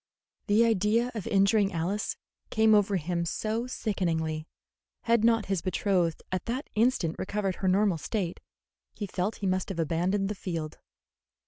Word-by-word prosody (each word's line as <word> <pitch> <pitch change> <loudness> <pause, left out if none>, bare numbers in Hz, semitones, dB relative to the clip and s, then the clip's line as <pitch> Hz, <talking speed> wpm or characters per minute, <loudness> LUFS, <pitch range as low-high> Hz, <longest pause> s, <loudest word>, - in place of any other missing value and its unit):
The 215 +2 +5
idea 225 +3 +2
of 215 -5 -5
injuring 200 0 +3
Alice 180 +6 -2 0.3
came 220 -1 +4
over 205 -1 +4
him 170 0 -1
so 220 +7 -2
sickeningly 165 -9 -2 0.6
that, - - -19
had 230 -2 +4
not 225 -2 +4
his 195 -3 -1
betrothed 185 -3 0
at 185 -2 -2
that 255 +5 -4
instant 215 -8 +1
recovered 195 -1 -2
her 190 - -1
normal 190 -2 +3
state, 180 0 -3 0.6
he 210 - -4
felt 195 +2 -2
that - - -17
he - - -2
must 185 0 0
have 190 - -4
abandoned 175 +5 0
the 210 - -2
field. 165 -6 -5
195 Hz, 160 wpm, -28 LUFS, 175-215 Hz, 0.6 s, The